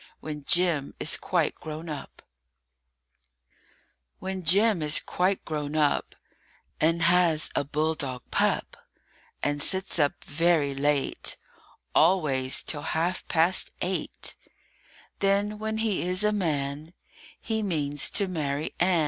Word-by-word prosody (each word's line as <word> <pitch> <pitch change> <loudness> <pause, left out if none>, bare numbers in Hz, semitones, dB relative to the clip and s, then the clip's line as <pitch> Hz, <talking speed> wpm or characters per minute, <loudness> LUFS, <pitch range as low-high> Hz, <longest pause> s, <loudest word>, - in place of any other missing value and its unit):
WHEN 150 -2 -7
JIM 170 -5 +3
IS 155 - +2
QUITE 170 -5 0
GROWN 155 +1 -8
UP 150 -3 -8 1.9
WHEN 190 -1 -5
Jim 200 +3 +4
is 150 0 +3
quite 185 +2 -1
grown 150 -1 -4
up, 150 -2 +1 0.6
And 165 +2 +2
has 170 -2 +3
a - - 0
bulldog 145 -3 -2
pup, - - 0 0.7
And 145 0 0
sits 190 +2 +2
up 145 -2 +1
very 155 -2 +1
late 140 0 0 0.6
Always 150 -7 +2
till 145 - -2
half 165 +4 -2
past 175 +2 +2
eight, 185 +1 -1 0.9
Then, 200 +2 +1
when 220 0 -3
he 220 -3 0
is 180 +3 +2
a 210 - +3
man, 155 -4 -2 0.5
He 220 -1 -2
means 145 -7 0
to 200 - +2
marry 150 -4 -3
Ann. 180 -1 +3
160 Hz, 120 wpm, -26 LUFS, 145-185 Hz, 1.9 s, Jim